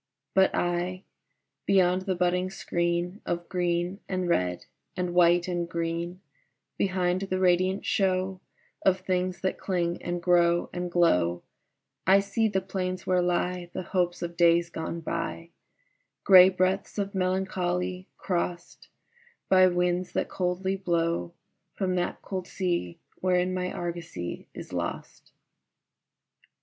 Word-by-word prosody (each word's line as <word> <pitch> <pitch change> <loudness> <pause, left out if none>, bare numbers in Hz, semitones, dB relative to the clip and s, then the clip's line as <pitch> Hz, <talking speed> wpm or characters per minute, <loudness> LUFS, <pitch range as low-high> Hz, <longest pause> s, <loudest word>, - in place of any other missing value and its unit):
But 190 0 +5
I 175 +2 -1 0.6
beyond 185 -1 +3
the 190 - +1
budding 180 +1 +1
screen 175 +1 -2
Of 175 0 -3
green 175 +1 -1
and 185 -1 -1
red 90 - 0 0.3
and 180 -1 -1
white 175 0 +4
and 175 -1 -2
green, 170 +2 -3 0.5
Behind 185 -1 0
the 190 -1 -2
radiant 185 +1 +2
show 185 -1 0 0.4
Of 190 -1 +3
things 185 0 -1
that 190 - -1
cling 175 -2 -1
and 175 0 -3
grow 175 0 +3
and 180 0 -3
glow 90 - +2 0.6
I 195 +1 +7
see 200 +3 0
the 190 -3 0
plains 185 -1 -3
where 185 -1 +2
lie 180 0 -1
The - - -3
hopes 175 -1 -1
of 170 0 -5
days 170 0 +4
gone 165 +1 -4
by: 165 +1 -4 0.7
Gray 185 -2 +9
breadths 185 +2 0
of 200 0 -2
melancholy, 185 -1 -1
crossed 175 -1 -3 0.6
By 185 -1 +7
winds 180 0 0
that - - -1
coldly 190 +1 -1
blow 170 - -1 0.4
From 185 -2 -1
that 175 - -2
cold 185 -2 -4
sea 175 - -2 0.2
wherein 180 0 +1
my 180 0 -2
argosy 170 - -5
is - - -9
lost. - - -5
180 Hz, 130 wpm, -27 LUFS, 175-185 Hz, 0.7 s, Gray